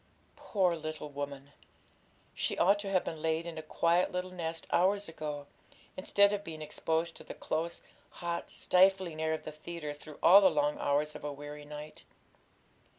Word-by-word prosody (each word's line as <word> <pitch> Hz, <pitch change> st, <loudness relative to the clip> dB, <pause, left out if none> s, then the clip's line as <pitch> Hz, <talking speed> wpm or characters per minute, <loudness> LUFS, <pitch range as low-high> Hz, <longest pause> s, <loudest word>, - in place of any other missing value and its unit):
Poor 185 Hz, -4 st, +1 dB
little 155 Hz, -1 st, -5 dB
woman! 140 Hz, 0 st, -6 dB, 0.8 s
She -, -, -1 dB
ought 200 Hz, +3 st, +4 dB
to 205 Hz, -1 st, -4 dB
have 185 Hz, -2 st, +2 dB
been 160 Hz, -1 st, -5 dB
laid 160 Hz, +1 st, 0 dB
in 165 Hz, -2 st, -5 dB
a -, -, -4 dB
quiet 170 Hz, +3 st, +2 dB
little 180 Hz, 0 st, -3 dB
nest 165 Hz, -2 st, -4 dB
hours 200 Hz, +3 st, +3 dB
ago, 150 Hz, -3 st, -5 dB, 0.5 s
instead 200 Hz, +2 st, +4 dB
of 205 Hz, 0 st, -2 dB
being 160 Hz, -3 st, -7 dB
exposed 160 Hz, +2 st, -1 dB
to -, -, -10 dB
the -, -, -9 dB
close, 165 Hz, +2 st, -3 dB, 0.3 s
hot, 170 Hz, -1 st, -4 dB
stifling 185 Hz, -3 st, +3 dB
air 160 Hz, 0 st, +1 dB
of -, -, -9 dB
the 155 Hz, -, -6 dB
theatre 155 Hz, 0 st, -6 dB
through 145 Hz, 0 st, -12 dB
all 195 Hz, +4 st, +9 dB
the 190 Hz, -, +7 dB
long 150 Hz, -2 st, +1 dB
hours 150 Hz, +2 st, +1 dB
of -, -, -10 dB
a 145 Hz, -, -3 dB
weary 145 Hz, +1 st, -8 dB
night. 150 Hz, +1 st, -9 dB
160 Hz, 175 wpm, -32 LUFS, 150-180 Hz, 0.8 s, all